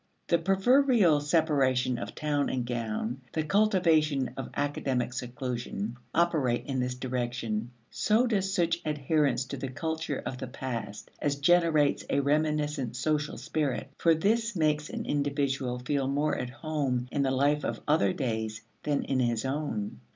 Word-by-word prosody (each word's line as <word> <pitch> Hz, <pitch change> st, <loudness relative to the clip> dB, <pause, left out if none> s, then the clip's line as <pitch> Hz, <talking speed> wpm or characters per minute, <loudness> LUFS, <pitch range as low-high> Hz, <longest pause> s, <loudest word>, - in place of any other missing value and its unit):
The 170 Hz, -, +4 dB
proverbial 195 Hz, -, +4 dB
separation 135 Hz, -5 st, +2 dB
of -, -, -6 dB
town 145 Hz, -2 st, 0 dB
and 125 Hz, -2 st, -1 dB
gown, 120 Hz, +1 st, -3 dB
the 160 Hz, -, 0 dB
cultivation 160 Hz, -, +3 dB
of 135 Hz, -, -5 dB
academic 135 Hz, -4 st, -1 dB
seclusion, 120 Hz, -4 st, -4 dB, 0.2 s
operate 155 Hz, -8 st, +1 dB
in 135 Hz, -2 st, -2 dB
this 125 Hz, 0 st, -1 dB
direction. 120 Hz, -3 st, -2 dB, 0.2 s
So 220 Hz, +4 st, +2 dB
does 195 Hz, -5 st, 0 dB
such 170 Hz, -3 st, +1 dB
adherence 150 Hz, -2 st, +1 dB
to 140 Hz, -, -6 dB
the 135 Hz, -, -4 dB
culture 160 Hz, +2 st, -3 dB
of 125 Hz, -, -5 dB
the -, -, -4 dB
past 115 Hz, -5 st, -6 dB
as 145 Hz, -1 st, +1 dB
generates 155 Hz, -1 st, +3 dB
a -, -, +2 dB
reminiscent 150 Hz, -3 st, 0 dB
social 150 Hz, +3 st, -1 dB
spirit, 145 Hz, -3 st, -2 dB
for 165 Hz, -1 st, +4 dB
this 225 Hz, +6 st, +1 dB
makes 155 Hz, -2 st, +1 dB
an -, -, -4 dB
individual 140 Hz, -3 st, 0 dB
feel 135 Hz, +2 st, -1 dB
more 145 Hz, +2 st, +1 dB
at 125 Hz, -, -3 dB
home 130 Hz, -2 st, -2 dB
in 140 Hz, -, 0 dB
the 135 Hz, -, +2 dB
life 145 Hz, +3 st, +2 dB
of -, -, -2 dB
other 155 Hz, +5 st, +3 dB
days 110 Hz, -8 st, -2 dB, 0.2 s
than 145 Hz, -1 st, 0 dB
in 135 Hz, -1 st, 0 dB
his 120 Hz, -1 st, 0 dB
own. 130 Hz, -, -3 dB
140 Hz, 150 wpm, -29 LUFS, 125-155 Hz, 0.2 s, The